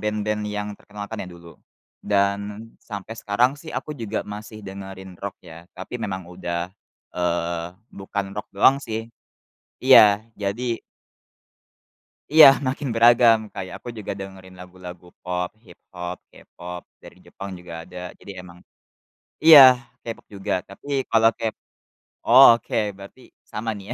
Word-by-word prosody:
band-band 105 0 -2
yang 105 0 -4
terkenal, 105 0 -10
kan, 110 - -4
ya, - - -10
dulu. 85 -1 -14 0.4
Dan 100 +2 -1
sampai 105 0 -8
sekarang 115 +4 +1
sih 165 - -12
aku 150 - -4
juga 115 -6 -4
masih 105 +1 -9
dengerin 95 -1 -9
rock 100 -1 -6
ya, 85 +2 -13
tapi 105 +6 -7
memang 95 -4 -4
udah, 85 0 -5 0.4
eee, 85 -1 -2 0.2
bukan 95 0 -5
rock 105 - -6
doang, 135 +7 +5
sih. 115 -2 -6 0.7
Iya, 105 +1 +6
jadi 115 +4 -3 1.5
Iya, 155 0 +10 0.2
makin 135 +2 -2
beragam, 115 0 +6 0.2
kayak 95 -1 -6
aku - - -11
juga 105 - -6
dengerin 95 -1 -10
lagu-lagu 90 -1 -11 0.2
pop, 90 0 -2 0.2
hip 90 -4 -17 0.2
hop, 90 0 -5 0.2
K-pop, 90 0 -10 0.2
dari - - -14
Jepang 100 0 -9
juga 90 -1 -12
ada, 90 - -14 0.2
jadi 100 - -10
emang 90 -1 -14 0.9
iya 160 -3 +11 0.4
K-pop 115 -1 -8
juga 95 -1 -3 0.2
tapi 100 +8 -14 0.2
kalau 115 0 +5
kep 110 -1 -2 0.7
oh 130 +3 +8
oke, 115 - -7 0.2
berarti 100 +5 -13 0.3
sama, 115 +1 -4
nih, 100 - -11
ya. - - -1
100 Hz, 140 wpm, -23 LUFS, 90-110 Hz, 1.5 s, iya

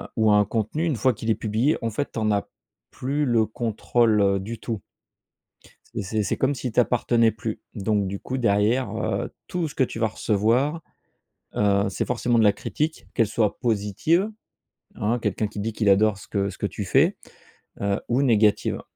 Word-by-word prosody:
ou 110 -2 +3
un 105 0 +5
contenu 110 - -1
une 160 -5 0
fois 125 +3 +2
qu'il 115 0 -2
est - - +2
publié, 115 +7 +1
en 115 - 0
fait 130 +7 -2
t'en 110 -2 -1
as 100 -1 0 0.4
plus 145 +3 -1
le 115 -4 +2
contrôle 110 -3 +1
du 115 +3 -6
tout 110 -4 -4 1.1
et - - -2
c'est 105 +3 -1
c'est - - -1
comme 135 +2 +1
s'il 125 -2 -4
t'appartenais 120 -1 +3
plus. 110 0 -5
Donc 105 -1 0
du 100 +1 -4
coup, 130 - -4
derrière, 110 +1 +2
heu, - - -2 0.2
tout 175 -3 -2
ce - - -11
que - - +1
tu 115 - -7
vas 110 -1 +2
recevoir, 120 +10 +1 0.7
heu, 100 -1 +2
c'est 95 - -2
forcément 120 -1 +1
de - - +5
la 105 -1 +5
critique, 155 +9 -3
qu'elle 115 - +2
soit 105 0 0
positive, 120 - +1 0.7
hein, 115 +4 0
quelqu'un 110 -1 -1
qui 105 - -9
dit 110 +2 -2
qu'il 105 -1 0
adore 100 +1 +4
ce - - -13
que 100 -1 -1
ce 95 - -12
que - - -1
tu 105 - -5
fais. 140 - +3 0.7
Heu, 100 0 0
ou 125 +3 +2
négative. 110 -6 +2
110 Hz, 185 wpm, -24 LUFS, 105-125 Hz, 1.1 s, un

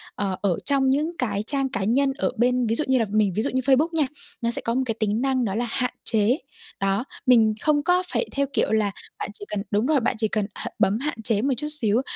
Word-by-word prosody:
ờ, 195 -2 -1
ở 195 -4 +1
trong 275 -2 +2
những 305 +5 0
cái 205 -5 -1
trang 275 +3 0
cá 240 -7 -2
nhân 270 +6 +2
ở - - 0
bên 250 +1 +2
ví 225 - +1
dụ 305 - +3
như 260 -1 +3
là 225 - +2
mình 210 -3 +2
ví 215 - +1
dụ - - 0
như 260 - +1
Facebook 270 +4 +3
nha, 310 -4 +2 0.3
nó 235 0 0
sẽ - - -3
có 230 - +1
một 260 - +1
cái 225 -3 -2
tính 215 +1 0
năng 260 -2 +1
đó 195 -1 -2
là 240 - 0
"Hạn 250 +1 -1
chế". 220 +4 +2 0.4
Đó, 195 +5 0 0.2
mình 225 -4 +5
không 295 -2 +2
có 360 +2 +3
phải - - +1
theo 280 0 0
kiểu - - +1
là 215 -2 +2 0.3
bạn - - -4
chỉ 205 - -9
cần 205 -1 -2
đúng 210 +2 +1
rồi, 295 0 +3
bạn 240 +1 0
chỉ 220 0 +1
cần 210 -1 0
h - - -4
bấm 205 +3 +2
hạn 280 -4 -4
chế 215 -2 +1
một 270 +3 +1
chút 300 - -2
xíu 240 -6 +3
240 Hz, 265 wpm, -24 LUFS, 215-270 Hz, 0.4 s, mình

